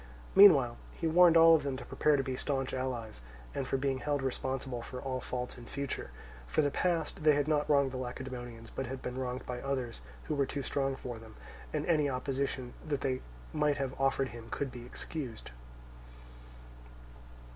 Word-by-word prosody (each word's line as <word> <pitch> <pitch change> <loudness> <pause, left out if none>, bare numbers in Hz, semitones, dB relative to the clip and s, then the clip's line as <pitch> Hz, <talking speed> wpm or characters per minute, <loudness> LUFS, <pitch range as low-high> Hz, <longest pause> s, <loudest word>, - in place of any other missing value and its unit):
Meanwhile 145 -12 +8 0.2
he 165 - -5
warned 170 +1 +7
all 165 0 +9
of 155 - +2
them 140 -2 -2
to - - -8
prepare 150 -1 +2
to 135 - +1
be 130 -1 -3
staunch 135 0 -2
allies, 120 - -3 0.3
and 135 -2 -2
for 135 - +1
being 135 -1 0
held 145 +2 -1
responsible 130 -1 -2
for 125 +2 -7
all 130 -1 -3
faults 125 0 -4
in 120 - -11
future: 140 -1 -4 0.4
for 155 - +2
the 145 - +1
past, 165 -1 0
they 155 -1 +6
had 145 0 +1
not 150 -1 +1
wronged 140 -2 +4
the 130 - -4
Lacedaemonians 120 -2 -6
but 135 - -3
had 130 +1 -6
been 125 +1 -4
wronged 125 0 -3
by 125 -1 -4
others 130 - -3 0.2
who - - -3
were 140 -2 +1
too 140 0 -3
strong 135 0 0
for 120 -3 -6
them, 110 -1 -13 0.4
and 150 -1 -1
any 150 -4 +3
opposition 130 -1 -2
that 150 -3 -2
they 130 -1 0 0.3
might 150 -1 +2
have 135 -2 -2
offered 135 -1 +2
him 115 0 -9
could 140 -2 -2
be 120 -1 -9
excused. 125 - -6
135 Hz, 190 wpm, -32 LUFS, 125-145 Hz, 0.4 s, all